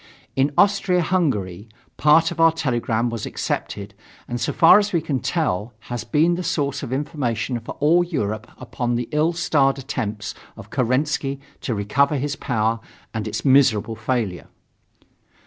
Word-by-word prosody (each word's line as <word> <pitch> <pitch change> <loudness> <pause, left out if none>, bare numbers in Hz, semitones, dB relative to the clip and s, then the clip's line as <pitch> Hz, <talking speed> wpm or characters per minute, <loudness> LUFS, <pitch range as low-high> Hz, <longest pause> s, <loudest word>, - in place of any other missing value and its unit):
In 135 +2 +2
Austria 195 -3 +3
Hungary, 110 - -1 0.3
part 160 +2 +4
of - - -7
our 165 0 +6
telegram 120 -6 -1
was 115 -2 -4
accepted 100 +1 -4 0.3
and, 120 0 -4
so - - 0
far 170 +4 +7
as 205 0 -1
we 170 - +2
can 140 -4 -2
tell, 120 - -1 0.2
has 120 - -3
been 160 +3 +2
the 180 +1 -3
source 140 -5 -1
of 130 - -6
information 130 -4 -2
for 115 - -8
all 165 +5 +4
Europe 110 - -3
upon 120 -1 -3
the 120 0 -2
ill 155 +3 +2
starred 145 -5 +2
attempt 110 -6 -4 0.2
of - - -12
Kerensky 135 +2 0 0.2
to 120 - -3
recover 140 +9 +1
his 145 +2 -2
power 115 -3 0 0.3
and 110 -1 -3
its 110 - -4
miserable 125 -5 +4
failure. 110 -5 -2
130 Hz, 155 wpm, -22 LUFS, 115-155 Hz, 0.3 s, far